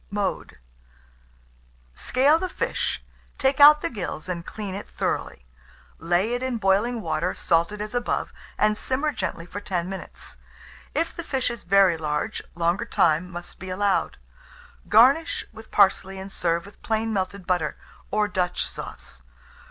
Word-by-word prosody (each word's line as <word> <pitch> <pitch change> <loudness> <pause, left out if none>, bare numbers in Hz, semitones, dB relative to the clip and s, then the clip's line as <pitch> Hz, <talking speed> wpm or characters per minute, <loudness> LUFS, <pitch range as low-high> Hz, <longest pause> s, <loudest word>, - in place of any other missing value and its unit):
Mode. 200 - -3 1.4
Scale 275 - +3
the 370 - -2
fish, - - -2 0.3
take 270 +1 +1
out 300 +1 +9
the - - -1
gills 180 -7 -5
and 175 -2 -3
clean 205 0 -6
it 200 - -7
thoroughly; - - -3 0.5
lay 175 +7 +1
it 245 - -1
in 260 -2 -1
boiling 215 +4 +2
water, - - -1
salted 170 +5 +1
as 210 0 -5
above, 245 -1 -1 0.2
and 215 0 +3
simmer 265 +7 0
gently 170 -7 -4
for 190 +3 -6
10 180 -4 -2
minutes. 190 0 -8 0.6
If 335 - 0
the 340 - -5
fish 265 -5 -1
is 235 - -8
very 190 -2 +5
large, 150 -1 -2
longer 170 +6 +1
time 170 -5 +2
must 175 0 -9
be 185 - -7
allowed. 195 +1 0 0.7
Garnish 265 +10 +5
with 220 0 -12
parsley, 195 -1 +3
and 190 +1 -7
serve 170 -1 0
with 200 - -15
plain 225 0 -1
melted 190 -1 -2
butter, 175 -4 0 0.3
or 210 0 +1
Dutch 180 -3 -1
sauce. 65 - -9
200 Hz, 150 wpm, -25 LUFS, 180-235 Hz, 1.4 s, out